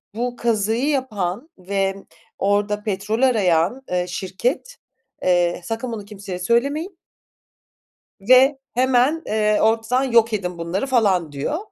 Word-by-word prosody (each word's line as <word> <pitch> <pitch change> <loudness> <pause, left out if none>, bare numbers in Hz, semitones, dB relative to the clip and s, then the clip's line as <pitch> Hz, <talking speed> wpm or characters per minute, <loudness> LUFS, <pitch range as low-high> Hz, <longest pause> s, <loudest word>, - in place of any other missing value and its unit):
bu 245 +1 -2
kazıyı 230 +3 0
yapan 240 - -2
ve 195 +1 -1 0.4
orada 205 +1 0
petrol 210 +3 -2
arayan, 215 -2 +2
ııı, 180 0 0
şirket, 235 - -3 0.5
eee, 175 -1 +2
“Sakın 230 +5 -4
bunu 210 -3 -6
kimseye 195 -3 -7
söylemeyin” 280 - 0 1.2
“ve 260 +5 +5
hemen, 260 +5 +2
eee, 215 0 +1
ortadan 225 +4 +2
yok 230 -3 +3
edin 180 -4 -3
bunları.” 170 +7 -2
falan, 195 - +2
diyor. 145 - -2
220 Hz, 120 wpm, -21 LUFS, 190-250 Hz, 1.2 s, ve